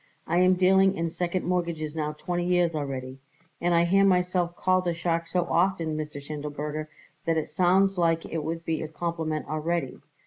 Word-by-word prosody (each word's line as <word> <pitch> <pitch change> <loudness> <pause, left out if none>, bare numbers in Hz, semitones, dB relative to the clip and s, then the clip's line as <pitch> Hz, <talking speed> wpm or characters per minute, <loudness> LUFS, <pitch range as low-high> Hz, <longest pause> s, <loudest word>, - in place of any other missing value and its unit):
I 170 +2 +1
am 185 0 +5
dealing 190 +1 +4
in 165 0 -1
second 175 +2 -2
mortgages 170 -4 -2
now 150 -1 -2
twenty 175 +3 -3
years 175 -2 +2
already, 135 -3 -4 0.4
and 175 0 +2
I 170 0 +4
hear 195 +3 +4
myself 180 -2 +2
called 185 0 +1
a 170 - 0
shark 170 0 -1
so 180 0 +1
often, 170 -2 +1
Mr. 150 -1 -5
Schindelberger, 150 +1 -5 0.4
that 165 -1 +1
it 155 - -2
sounds 185 +3 +3
like 165 -1 +2
it 160 -2 -3
would 165 +2 -4
be 160 -1 -1
a 155 - -3
compliment 160 -1 -3
already. 155 -2 -2
170 Hz, 180 wpm, -27 LUFS, 155-180 Hz, 0.4 s, am